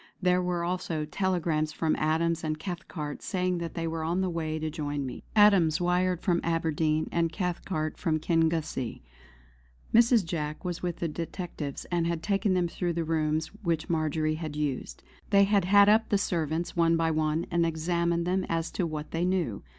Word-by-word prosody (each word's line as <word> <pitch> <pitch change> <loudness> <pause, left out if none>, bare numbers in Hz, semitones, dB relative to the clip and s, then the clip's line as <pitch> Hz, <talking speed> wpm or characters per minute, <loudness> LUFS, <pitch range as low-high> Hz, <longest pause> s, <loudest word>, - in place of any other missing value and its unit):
There 180 -1 +3
were 180 -1 -1
also 170 -3 -2
telegrams 160 -3 0
from 160 0 0
Adams 160 +2 +1
and 155 -1 -1
Cathcart 170 -4 -6
saying 180 -2 -1
that 170 -1 -5
they 165 -1 -2
were 165 0 -3
on 170 +4 0
the 185 -1 0
way 160 -2 -2
to 155 0 -3
join 145 -3 -3
me. 130 - -6
Adams 195 -7 +5
wired 180 0 +1
from 175 -3 +2
Aberdeen, 160 -2 0
and 165 -1 +1
Cathcart 175 -4 -3
from 160 -3 0
Kingussie. 160 -6 0 0.9
Mrs. 230 -3 +5
Jack 155 -1 -4
was 175 -1 -3
with 175 -2 -2
the 170 - -2
detectives 165 -2 -5
and 170 -1 +1
had 170 -1 -2
taken 200 -1 +1
them 180 -1 +2
through 175 0 -2
the 165 0 -1
rooms 155 0 0
which 170 -4 -1
Marjory 155 -1 0
had 155 -1 -5
used. 145 -3 -3 0.3
They 200 -1 +6
had 200 -2 +3
had 200 +2 +6
up 220 +2 +4
the 205 - +3
servants 165 -3 -1
one 165 -1 +3
by 165 0 +1
one 155 +1 0
and 170 0 +2
examined 170 +1 0
them 185 +1 +1
as 165 0 -1
to 180 - -1
what 155 -1 -5
they 165 +1 -1
knew. 180 - 0
165 Hz, 180 wpm, -28 LUFS, 155-180 Hz, 0.9 s, They